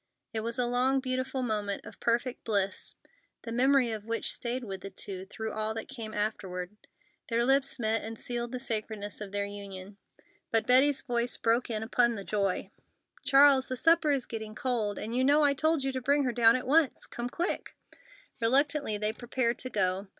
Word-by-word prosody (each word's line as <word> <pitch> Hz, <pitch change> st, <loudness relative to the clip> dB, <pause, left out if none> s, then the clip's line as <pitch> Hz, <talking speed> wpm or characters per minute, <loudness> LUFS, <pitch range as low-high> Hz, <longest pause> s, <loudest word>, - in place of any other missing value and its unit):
It 220 Hz, -, -1 dB
was 230 Hz, +1 st, -3 dB
a 250 Hz, -, +1 dB
long, 250 Hz, +2 st, +2 dB
beautiful 260 Hz, 0 st, -2 dB
moment 210 Hz, -4 st, -2 dB
of -, -, -11 dB
perfect 240 Hz, +2 st, 0 dB
bliss, 200 Hz, -3 st, -1 dB, 0.5 s
the 230 Hz, -, -6 dB
memory 255 Hz, 0 st, +3 dB
of 215 Hz, -2 st, -4 dB
which 230 Hz, +1 st, -1 dB
stayed 245 Hz, +1 st, -3 dB
with 195 Hz, -4 st, -6 dB
the 195 Hz, -, -7 dB
two 190 Hz, -1 st, -7 dB
through 220 Hz, +2 st, -5 dB
all 215 Hz, +1 st, -2 dB
that 225 Hz, -, -5 dB
came 230 Hz, -5 st, -7 dB
afterward. 205 Hz, -3 st, -3 dB, 0.5 s
Then 230 Hz, -, 0 dB
their 235 Hz, -, +3 dB
lips 270 Hz, 0 st, +2 dB
met 225 Hz, -1 st, 0 dB
and 225 Hz, +1 st, -6 dB
sealed 240 Hz, 0 st, -3 dB
the 255 Hz, -, -4 dB
sacredness 215 Hz, -4 st, -3 dB
of 200 Hz, -2 st, -6 dB
their 200 Hz, 0 st, -1 dB
union. 200 Hz, -1 st, -8 dB, 0.5 s
But 225 Hz, -1 st, +1 dB
Betty's 270 Hz, +3 st, +5 dB
voice 240 Hz, -2 st, 0 dB
broke 230 Hz, +2 st, +1 dB
in 220 Hz, -1 st, -2 dB
upon 235 Hz, +1 st, +2 dB
the 200 Hz, -, -6 dB
joy: 195 Hz, -2 st, -1 dB, 0.5 s
"Charles, 275 Hz, -1 st, +6 dB
the 255 Hz, -, -3 dB
supper 325 Hz, +1 st, +4 dB
is 275 Hz, -4 st, +1 dB
getting 220 Hz, -1 st, -6 dB
cold, 225 Hz, -6 st, -1 dB
and 225 Hz, +2 st, -4 dB
you 255 Hz, -, +2 dB
know 290 Hz, +3 st, +5 dB
I 285 Hz, -1 st, +4 dB
told 310 Hz, +1 st, +1 dB
you 270 Hz, -, 0 dB
to 260 Hz, -1 st, -3 dB
bring 285 Hz, +3 st, +2 dB
her 250 Hz, -2 st, 0 dB
down 230 Hz, -1 st, +5 dB
at 255 Hz, -, -2 dB
once. 295 Hz, +1 st, +2 dB
Come 240 Hz, +1 st, -5 dB
quick!" 345 Hz, +8 st, -3 dB, 0.7 s
Reluctantly 275 Hz, -1 st, +2 dB
they 210 Hz, +1 st, +1 dB
prepared 240 Hz, 0 st, -1 dB
to 255 Hz, -, -2 dB
go. 190 Hz, -2 st, 0 dB
235 Hz, 195 wpm, -29 LUFS, 215-260 Hz, 0.7 s, Charles